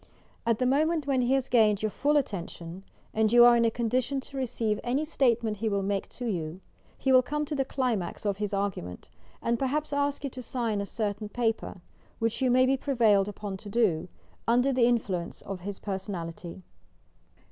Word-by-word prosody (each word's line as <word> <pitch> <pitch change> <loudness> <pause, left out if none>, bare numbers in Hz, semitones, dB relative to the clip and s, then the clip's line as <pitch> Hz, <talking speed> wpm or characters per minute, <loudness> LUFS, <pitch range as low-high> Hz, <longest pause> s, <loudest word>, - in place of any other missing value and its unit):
At 230 -2 +3
that 255 - 0
moment 305 +4 +2
when 270 -2 +1
he 250 +2 +2
has 265 -2 0
gained 215 -4 +3
your 215 - 0
full 295 +7 +1
attentioui 290 - +5
PERSONAL 170 -3 -7
MAGNETISM 190 +2 -11 0.3
and 215 0 +2
you 240 0 +8
are 240 0 +7
in 235 0 +3
a - - +4
condition 245 +4 -1
to 275 - -13
receive 235 -5 -1
any 265 +6 0
statement 235 -7 +1
he 225 +2 -1
will 200 -1 0
make 195 0 -2
to 245 - -7
you, 175 -5 -3 0.4
he 265 - 0
will 255 -1 +7
come 300 +4 -2
to 300 - -5
the 275 -2 +1
climax 250 -9 -2
of 200 -1 0
Mi 210 - +1
argument 195 - -3 0.3
and 235 0 +1
perhaps 290 +3 -1
ask 285 0 0
you 280 - -2
to 255 - -7
sign 230 -4 -2
a 200 - -4
certain 210 -1 -3
paper, 225 -5 -2 0.4
which 230 +3 -1
you 260 - +3
may 255 +1 +5
be 270 +1 +2
prevailed 225 -8 +3
upon 205 -1 -5
to 205 +2 -10
do, 200 -7 +1 0.4
under 245 +3 +4
influence 235 -8 0
of 195 -2 -6
his 195 +2 -6
personality. 185 -3 -6
230 Hz, 200 wpm, -28 LUFS, 200-255 Hz, 0.4 s, you